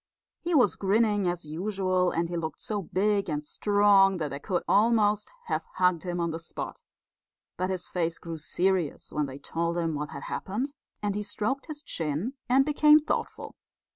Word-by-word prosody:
He 345 -1 -1
was 245 -9 +4
grinning 205 0 +2
as 175 -2 -2
usual, 185 +2 0
and 170 0 -1
he 175 - -5
looked 160 -2 -4
so 215 -4 -2
big 200 +2 0
and 150 -1 -2
strong 200 +2 +4
that 155 -3 -2
they 140 - -4
could 180 +2 -1
almost 210 -1 +3
have - - -1
hugged 180 -3 +3
him 175 -1 -2
on 170 -1 0
the 165 - -4
spot; 165 - -7 0.7
but 185 +1 -1
his 185 -2 -2
face 170 -2 -1
grew 165 -2 -7
serious 180 0 -1
when 150 -1 0
they 135 0 -8
told 170 +4 -2
him 165 -2 0
what 150 0 -3
had 140 - -8
happened, 245 +9 -3 0.3
and 205 -1 0
he 210 - -2
stroked 215 +6 -2
his 300 -1 -6
chin 160 - -2 0.2
and 265 +2 +5
became 300 0 +6
thoughtful. 305 - -3
185 Hz, 180 wpm, -28 LUFS, 165-210 Hz, 0.7 s, became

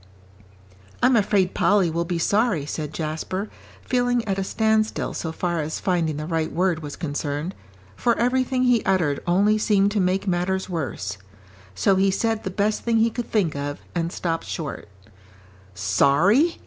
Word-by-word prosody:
"I'm 250 0 +5
afraid 195 -3 +2
Polly 195 -5 +3
will 170 +1 -1
be 175 0 -2
sorry," 200 -3 +1
said 150 0 -4
Jasper, 165 +6 -4 0.3
feeling 245 -2 +1
at 195 -1 0
a - - 0
standstill 220 +2 0
so 160 - -4
far 175 0 -2
as 155 +1 -4
finding 170 -5 0
the 150 - -4
right 160 -1 -1
word 175 -2 0
was 145 -2 -6
concerned, 145 +2 -3 0.4
for 235 - +1
everything 255 +1 +1
he 245 -3 +3
uttered 165 -7 +1
only 205 +5 +3
seemed 205 -2 +3
to 210 - 0
make 185 +1 +1
matters 185 +1 0
worse. 115 - -4 0.6
So 195 - +3
he 195 +1 +3
said 225 +3 0
the 190 - -3
best 205 +3 0
thing 230 -1 +1
he 225 +1 +3
could 240 +1 -5
think 190 -9 +1
of, 145 0 -4
and 170 -1 -1
stopped 165 -2 -2
short. 150 -8 -5 0.9
"Sorry?" 145 - +3
185 Hz, 160 wpm, -23 LUFS, 160-215 Hz, 0.9 s, I'm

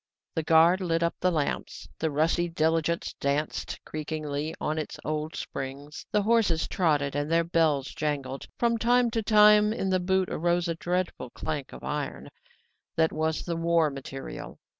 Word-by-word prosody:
The 160 - 0
guard 165 +4 +5
lit 170 -2 0
up 170 - +1
the 185 - +2
lamps. 155 -5 -2
The 160 - 0
rusty 165 +4 +1
diligence 165 0 0
danced 140 +2 -2
creakingly 155 0 -4
on 155 +1 -1
its 155 - -5
old 155 +1 -2
springs; 140 +2 -6
the 210 - +2
horses 210 -7 +2
trotted 145 -6 +1
and 145 +2 -1
their 165 0 +4
bells 160 -5 +1
jangled. 140 -3 -3
From 235 -1 +1
time 245 +1 +3
to 225 - 0
time 210 0 +6
in 195 -4 -1
the 185 - +3
boot 190 +1 +1
arose 175 +1 +1
a 170 - 0
dreadful 175 -5 -2
clank 145 +1 -4
of - - -11
iron: 150 -1 -4 0.7
that 160 0 +3
was 160 0 -1
the 170 - -2
war 165 -2 +2
material. 135 0 -7
160 Hz, 160 wpm, -27 LUFS, 150-180 Hz, 0.7 s, time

